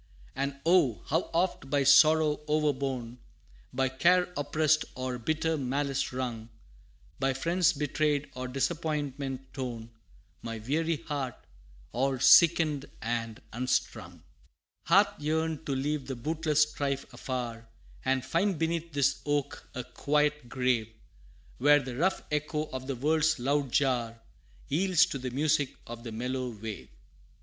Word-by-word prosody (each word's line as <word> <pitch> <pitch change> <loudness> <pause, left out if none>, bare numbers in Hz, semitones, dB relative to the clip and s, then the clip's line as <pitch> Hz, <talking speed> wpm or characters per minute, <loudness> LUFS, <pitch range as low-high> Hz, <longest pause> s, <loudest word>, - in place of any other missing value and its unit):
And 140 +1 -2
oh! 165 - +3
how 160 +4 0
oft 170 -5 0
by 140 0 +2
sorrow 155 +2 +6
overborne, 135 -5 -1 0.5
By 130 +1 0
care 180 +7 +3
oppressed, 155 +1 +2
or 130 -1 -3
bitter 160 +5 0
malice 135 0 -1
wrung, 120 -3 -4 0.7
By 135 0 +1
friends 170 +5 +2
betrayed, 150 -1 0
or 130 0 -5
disappointment 135 -2 -3
torn, 120 -4 -5 0.5
My 115 -1 -5
weary 155 +8 -1
heart, 140 -4 -3 0.6
all 130 +3 0
sickened 150 +2 +5
and 115 -1 -3
unstrung 125 +2 -2 0.6
Hath - - +4
yearned 160 +1 -1
to 140 - 0
leave 145 +1 -2
the 135 - -3
bootless 150 +3 +1
strife 140 -2 -2
afar, 120 -3 -5 0.4
And 130 -1 0
find 190 +2 +1
beneath 165 0 -2
this 140 -1 +1
oak 145 -1 -2
a 125 - -3
quiet 150 -1 0
grave, 125 -4 0 0.7
Where 145 +3 +6
the 130 -3 -6
rough 180 +8 0
echo 150 +1 -1
of 130 0 -5
the 135 - -2
world's 155 +4 +2
loud 135 +1 0
jar, 120 -5 +1 0.5
Yields 180 +3 +3
to 135 - -5
the 125 0 -4
music 145 +1 +1
of 115 0 -8
the 115 - -6
mellow 125 +3 -3
wave! 110 -2 -7
140 Hz, 130 wpm, -29 LUFS, 125-155 Hz, 0.7 s, sorrow